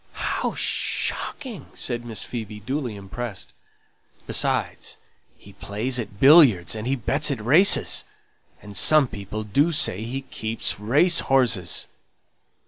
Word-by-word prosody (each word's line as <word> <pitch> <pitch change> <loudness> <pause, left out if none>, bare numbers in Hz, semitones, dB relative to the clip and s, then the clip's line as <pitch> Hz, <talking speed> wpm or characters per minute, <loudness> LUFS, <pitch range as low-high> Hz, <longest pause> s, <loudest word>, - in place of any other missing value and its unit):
"How - - -2
shocking!" 230 - -3
said 120 -2 -3
Miss 115 -2 -4
Phoebe, 110 -3 -7
duly 130 +1 -4
impressed. 105 +2 -8 0.7
"Besides, - - -1 0.4
he 100 - -17
plays 115 +7 -3
at 105 -3 -7
billiards, 130 - +6
and 110 +1 -5
he 135 - 0
bets 140 +5 0
at 135 -5 -2
races, 155 - +4 0.6
and 105 -1 -11
some 155 +6 +4
people 105 0 -7
do 140 +11 +1
say 110 - +1
he 130 +4 -5
keeps 115 -5 -3
race 150 - +3
horses." 125 -10 +1
120 Hz, 125 wpm, -23 LUFS, 105-140 Hz, 0.7 s, billiards